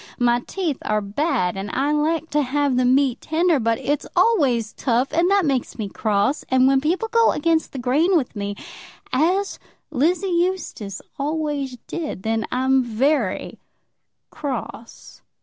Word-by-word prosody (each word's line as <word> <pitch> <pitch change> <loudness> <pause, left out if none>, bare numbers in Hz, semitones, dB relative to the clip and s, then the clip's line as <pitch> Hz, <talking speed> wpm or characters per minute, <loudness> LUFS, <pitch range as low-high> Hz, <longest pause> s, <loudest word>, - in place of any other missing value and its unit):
My 240 0 +3
teeth 320 +1 -3
are 215 0 0
bad, 200 - -1
and 195 +1 -5
I 275 +7 0
like 315 +2 0
to 295 - +2
have 280 0 0
the 250 0 +2
meat 260 0 +2
tender. 325 -1 +2
But 230 -1 +1
it's 290 +1 -2
always 255 - +2
tough, 245 +2 0
and 340 +3 +3
that 395 -2 +3
makes 270 -4 -1
me 210 -4 -4
cross. 210 +7 0
And 260 0 +4
when 270 0 +3
people 350 +9 0
go 460 0 +3
against 320 +1 +1
the - - -7
grain 295 +9 +2
with 255 -6 -3
me, 205 0 -3 0.6
as 365 +9 +1 0.3
Lizzie 335 +8 +1 0.2
Eustace 290 - -4 0.2
always 290 -3 -2
did, 300 - -5
then 225 0 0
I'm 260 +1 +2
very 240 -1 0 0.7
cross." 255 -4 -7
275 Hz, 150 wpm, -22 LUFS, 240-320 Hz, 0.7 s, And